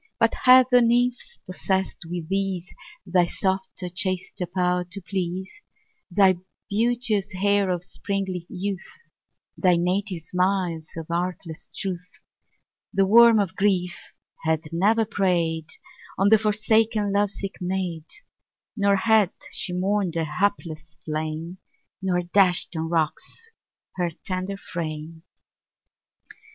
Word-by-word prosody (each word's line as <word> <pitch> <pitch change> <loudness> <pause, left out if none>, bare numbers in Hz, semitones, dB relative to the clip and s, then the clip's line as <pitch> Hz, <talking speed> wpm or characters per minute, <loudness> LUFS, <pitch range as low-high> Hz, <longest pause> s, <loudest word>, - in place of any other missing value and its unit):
2 - - -55
But - - +4
had 255 0 +9
the 250 0 +7
nymph 245 - +1
possess'd 190 -1 -1
with 170 -1 -5
these 195 -2 -2 0.3
Thy 180 -1 +3
softer, 190 0 -2
chaster 185 0 -2
power 180 -1 0
to 175 +3 -7
please, 190 - -4 0.5
Thy 190 0 +4 0.3
beauteous 220 -2 +1
air 200 0 +2
of 180 -1 -1
sprightly 190 -3 -4
youth, 190 0 -4 0.7
Thy 180 -2 +3
native 180 0 -1
smiles 180 -2 0
of 165 - -5
artless 170 -2 -3
truth 180 -1 -4
3 - - -21 0.8
The 195 0 +4
worm 230 +3 +7
of 190 -2 -1
grief 190 -3 +1 0.5
had 160 0 0
never 215 +6 +3
prey'd 170 -6 0 0.5
On 195 +1 +3
the 220 0 +6
forsaken 215 0 +2
love 205 0 +2
sick 195 0 -5
maid; 180 -3 -2 0.7
Nor 200 -2 +3
had 215 -1 +4 0.2
she - - -3
mourn'd 185 -1 0
a 165 - +1
hapless 160 -2 -2
flame, 155 +3 -4 0.4
Nor 180 -2 0
dash'd 180 -1 +2
on 160 0 -2
rocks 170 - -2 0.5
her 175 -1 0
tender 185 +3 -4
frame. 160 -3 -6
185 Hz, 120 wpm, -24 LUFS, 175-200 Hz, 0.8 s, had